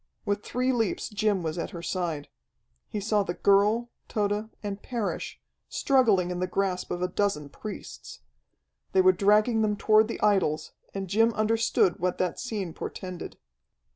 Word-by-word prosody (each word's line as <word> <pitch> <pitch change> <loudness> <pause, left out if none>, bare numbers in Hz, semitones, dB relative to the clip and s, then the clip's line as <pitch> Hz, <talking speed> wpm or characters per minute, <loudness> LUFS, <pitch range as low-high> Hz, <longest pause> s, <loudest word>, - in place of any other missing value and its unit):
With 205 0 0
three 255 +4 0
leaps 225 -5 -1
Jim 210 -3 0
was 160 +1 -3
at - - -3
her 170 -1 -8
side. 170 -6 -2 0.6
He 210 - -4
saw 210 +1 +1
the 180 -3 -3
girl, 210 +4 +3 0.2
Tode, 210 +1 -1
and 200 -1 -4
Parrish, 235 -5 -3 0.3
struggling 220 -10 +3
in 180 - -3
the 185 - 0
grasp 185 -1 -1
of 175 0 -2
a - - +2
dozen 180 -6 -1
priests. 70 - -9 0.7
They 190 - +6
were 185 0 +7
dragging 210 +4 +3
them 210 -1 +1
toward 215 +1 +4
the 230 - -5
idols, 190 -7 +2 0.2
and 195 -1 -4
Jim 225 +5 +3
understood 215 -4 +2
what 180 0 0
that 180 - -1
scene 205 -9 -4
portended. 185 -2 -7
200 Hz, 160 wpm, -27 LUFS, 180-215 Hz, 0.7 s, were